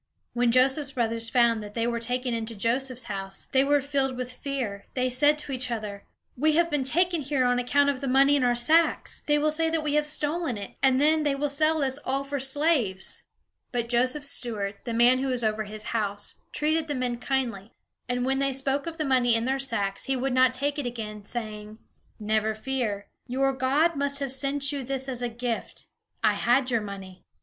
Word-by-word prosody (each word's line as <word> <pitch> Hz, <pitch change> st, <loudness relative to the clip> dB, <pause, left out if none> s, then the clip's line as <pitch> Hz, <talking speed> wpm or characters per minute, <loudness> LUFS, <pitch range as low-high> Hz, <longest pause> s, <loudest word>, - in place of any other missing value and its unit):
When 240 Hz, -1 st, +2 dB
Joseph's 265 Hz, +3 st, +3 dB
brothers 230 Hz, -1 st, -1 dB
found 235 Hz, -3 st, +3 dB
that 210 Hz, 0 st, -9 dB
they 230 Hz, -1 st, 0 dB
were 235 Hz, 0 st, -1 dB
taken 250 Hz, +1 st, -1 dB
into 230 Hz, 0 st, -4 dB
Joseph's 250 Hz, +4 st, -1 dB
house, 195 Hz, -3 st, -5 dB
they 265 Hz, 0 st, +4 dB
were 285 Hz, +1 st, +3 dB
filled 270 Hz, -2 st, -1 dB
with 250 Hz, 0 st, -5 dB
fear. 250 Hz, -8 st, -4 dB
They 255 Hz, -1 st, +1 dB
said 290 Hz, +4 st, +4 dB
to 295 Hz, -1 st, -5 dB
each 255 Hz, -1 st, -2 dB
other: 210 Hz, -4 st, -5 dB, 0.3 s
"We 310 Hz, +4 st, +2 dB
have 335 Hz, +1 st, +2 dB
been 295 Hz, -2 st, +1 dB
taken 345 Hz, +4 st, +2 dB
here 270 Hz, -2 st, 0 dB
on 245 Hz, 0 st, +2 dB
account 285 Hz, +3 st, +2 dB
of 270 Hz, -1 st, -7 dB
the 275 Hz, -, -3 dB
money 275 Hz, +2 st, +5 dB
in 280 Hz, -, +1 dB
our 245 Hz, -1 st, +3 dB
sacks. 315 Hz, +8 st, +2 dB
They 295 Hz, 0 st, +4 dB
will 305 Hz, +1 st, +2 dB
say 325 Hz, +1 st, +2 dB
that 320 Hz, -1 st, -1 dB
we 295 Hz, -1 st, -1 dB
have 300 Hz, 0 st, +2 dB
stolen 300 Hz, -3 st, -1 dB
it, 200 Hz, -1 st, -7 dB
and 265 Hz, -1 st, +4 dB
then 310 Hz, +2 st, +3 dB
they 290 Hz, -2 st, +1 dB
will 290 Hz, +1 st, -1 dB
sell 310 Hz, +2 st, +2 dB
us 265 Hz, +1 st, 0 dB
all 270 Hz, +1 st, -1 dB
for 280 Hz, 0 st, -3 dB
slaves." 265 Hz, -, 0 dB, 0.5 s
But 240 Hz, -2 st, -2 dB
Joseph's 255 Hz, +4 st, +1 dB
steward, 205 Hz, -4 st, -3 dB
the 235 Hz, -, -3 dB
man 245 Hz, +2 st, +5 dB
who 270 Hz, -, -1 dB
was 250 Hz, -2 st, 0 dB
over 215 Hz, 0 st, 0 dB
his 215 Hz, +1 st, -6 dB
house, 205 Hz, -2 st, -2 dB, 0.2 s
treated 310 Hz, +1 st, 0 dB
the 290 Hz, -, -2 dB
men 250 Hz, -2 st, -2 dB
kindly; 235 Hz, -7 st, -2 dB, 0.4 s
and 245 Hz, 0 st, 0 dB
when 270 Hz, +1 st, +1 dB
they 275 Hz, 0 st, +1 dB
spoke 270 Hz, +3 st, -1 dB
of 330 Hz, -1 st, -5 dB
the 310 Hz, -, -1 dB
money 250 Hz, -3 st, +3 dB
in 230 Hz, +1 st, 0 dB
their 265 Hz, +1 st, 0 dB
sacks, 205 Hz, -7 st, -1 dB
he 270 Hz, -, 0 dB
would 260 Hz, +1 st, -1 dB
not 255 Hz, 0 st, +5 dB
take 285 Hz, +3 st, -2 dB
it 270 Hz, -, -2 dB
again, 215 Hz, -4 st, -6 dB
saying: 215 Hz, -2 st, -6 dB, 0.4 s
"Never 215 Hz, 0 st, 0 dB
fear; 220 Hz, -4 st, -3 dB, 0.2 s
your 270 Hz, +2 st, +1 dB
God 280 Hz, +6 st, +2 dB
must 280 Hz, 0 st, +1 dB
have 275 Hz, -2 st, 0 dB
sent 275 Hz, +1 st, +2 dB
you 280 Hz, -2 st, -3 dB
this 265 Hz, +1 st, -2 dB
as 250 Hz, -2 st, -4 dB
a 245 Hz, -, -1 dB
gift. 235 Hz, 0 st, -4 dB, 0.4 s
I -, -, +4 dB
had 255 Hz, +2 st, +2 dB
your 235 Hz, -2 st, +2 dB
money." 195 Hz, -2 st, -9 dB
255 Hz, 215 wpm, -26 LUFS, 230-280 Hz, 0.5 s, money